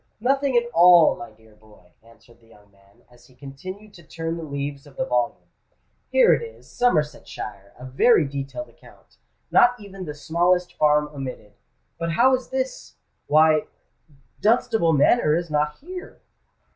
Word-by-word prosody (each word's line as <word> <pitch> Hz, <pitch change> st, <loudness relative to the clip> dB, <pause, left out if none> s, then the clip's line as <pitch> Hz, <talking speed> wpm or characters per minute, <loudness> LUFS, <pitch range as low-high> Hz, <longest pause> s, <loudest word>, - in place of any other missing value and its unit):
nothing 270 Hz, +2 st, +1 dB
at 240 Hz, -, +3 dB
all, 175 Hz, -1 st, +6 dB
my 120 Hz, -, -10 dB
dear 110 Hz, 0 st, -23 dB
boy," 105 Hz, -4 st, -22 dB
answered 115 Hz, +1 st, -22 dB
the 115 Hz, -, -24 dB
young 105 Hz, -2 st, -22 dB
man, 100 Hz, 0 st, -27 dB
as 120 Hz, -1 st, -21 dB
he 130 Hz, -, -23 dB
continued 185 Hz, +11 st, -10 dB
to 170 Hz, -, -15 dB
turn 165 Hz, +1 st, -5 dB
the 170 Hz, -, -7 dB
leaves 140 Hz, -2 st, -6 dB
of -, -, -17 dB
the -, -, -1 dB
volume. -, -, -2 dB, 0.6 s
"Here -, -, +5 dB
it -, -, 0 dB
is—Somersetshire—a 150 Hz, -, -4 dB
very 150 Hz, -, +3 dB
detailed 140 Hz, -, -6 dB
account—not 245 Hz, 0 st, -2 dB
even 195 Hz, -2 st, -10 dB
the 150 Hz, -2 st, -7 dB
smallest 175 Hz, +4 st, 0 dB
farm 150 Hz, 0 st, +2 dB
omitted. 130 Hz, -7 st, -8 dB, 0.5 s
But 165 Hz, 0 st, -2 dB
how 255 Hz, +9 st, +4 dB
is 255 Hz, -1 st, -2 dB
this? 260 Hz, 0 st, -4 dB, 0.3 s
Why—Dunstable 160 Hz, -, 0 dB
Manor 150 Hz, -, +3 dB
is 170 Hz, -1 st, -3 dB
not 150 Hz, 0 st, -1 dB
here!" 365 Hz, +4 st, -10 dB
155 Hz, 145 wpm, -23 LUFS, 135-210 Hz, 0.6 s, all